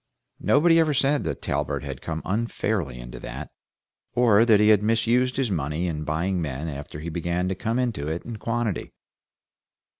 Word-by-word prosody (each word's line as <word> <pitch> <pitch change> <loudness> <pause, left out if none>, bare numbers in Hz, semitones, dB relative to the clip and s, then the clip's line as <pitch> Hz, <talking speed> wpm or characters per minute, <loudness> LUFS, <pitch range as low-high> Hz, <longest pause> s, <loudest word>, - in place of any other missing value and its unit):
Nobody 165 +2 +4
ever 155 -3 +3
said 140 +2 +2
that - - -4
Talbert - - -1
had - - -6
come 80 -1 -4
unfairly 105 - -1
into - - -8
that, - - -7 0.6
or 115 -3 +5
that 110 -3 +5
he 105 0 +5
had 105 -2 +6
misused 115 +4 +2
his 130 -5 0
money 75 0 -1
in 75 -3 -3
buying 85 +5 0
men 75 0 -3
after 75 0 -6
he 85 - -4
began 85 +2 -1
to - - 0
come 110 +5 -2
into 120 - -1
it 80 +2 -3
in 115 -2 -6
quantity. 115 -4 -2
100 Hz, 175 wpm, -25 LUFS, 80-120 Hz, 0.6 s, had